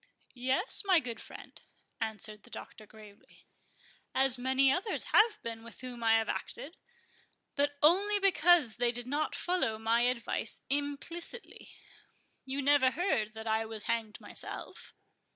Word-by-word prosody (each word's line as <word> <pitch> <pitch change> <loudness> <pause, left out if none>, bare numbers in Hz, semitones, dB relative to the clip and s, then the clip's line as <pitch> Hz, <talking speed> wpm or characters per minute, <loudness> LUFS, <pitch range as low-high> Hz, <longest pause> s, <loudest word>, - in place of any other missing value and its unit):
"Yes, 260 - +2
my 385 -2 +3
young 245 -9 0
friend," - - -12 0.4
answered 215 -1 -1
the - - -17
Doctor, 215 - -10
gravely, 210 -2 -17 0.7
"as 265 -1 +4
many 265 +1 +3
others 375 +9 0
have 430 0 +5
been 230 -1 -6
with 235 - -10
whom 250 -2 -7
I 225 -1 +4
have 225 -1 +2
acted; 320 +6 -5 0.8
but 285 0 0
only 395 +7 +4
because 350 - +3
they 240 0 +1
did 240 0 -3
not 290 +4 -2
follow 350 -12 0
my 225 +2 +1
advice 240 -2 +1
implicitly. 290 +9 -3 0.8
You 270 +1 -3
never 280 -2 +4
heard 260 - -1
that 220 0 -8
I 220 0 +1
was 220 -1 -5
hanged 225 -2 -2
myself?" - - -9
255 Hz, 140 wpm, -31 LUFS, 225-305 Hz, 0.8 s, have